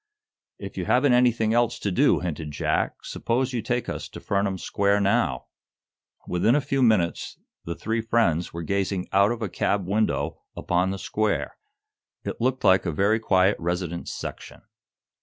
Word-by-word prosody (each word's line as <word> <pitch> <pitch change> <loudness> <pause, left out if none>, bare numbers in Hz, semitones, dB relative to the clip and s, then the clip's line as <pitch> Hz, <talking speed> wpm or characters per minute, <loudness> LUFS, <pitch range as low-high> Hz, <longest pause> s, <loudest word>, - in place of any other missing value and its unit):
"If - - -9
you - - -2
haven't 130 +1 +3
anything 120 -3 +3
else 120 0 +2
to 100 - -2
do," 90 - +3
hinted 80 -3 -4
Jack, 75 - -1
"suppose 125 +2 -1
you 120 - -1
take 120 +2 -2
us - - -5
to - - -9
Furnam 100 -1 -1
Square 100 +2 +1
now." 100 - +1 0.8
Within 100 +8 +2
a - - +4
very 140 - -9
few 135 -1 +1
minutes 105 -9 +1 0.3
the 85 - -4
three 115 +5 -2
friends 110 -7 +1
were 85 0 -6
gazing 95 0 -1
out 100 +3 +4
of 120 -1 -3
a - - 0
cab 100 +1 -1
window 105 +3 0 0.2
upon 90 +1 0
the 95 - -3
square. 100 - -1 0.7
It - - -5
looked 130 +2 0
like 95 0 +4
a - - 0
very 100 +8 +2
quiet 95 -2 +3
residence 85 0 -3
section. - - -8
100 Hz, 170 wpm, -25 LUFS, 90-115 Hz, 0.8 s, a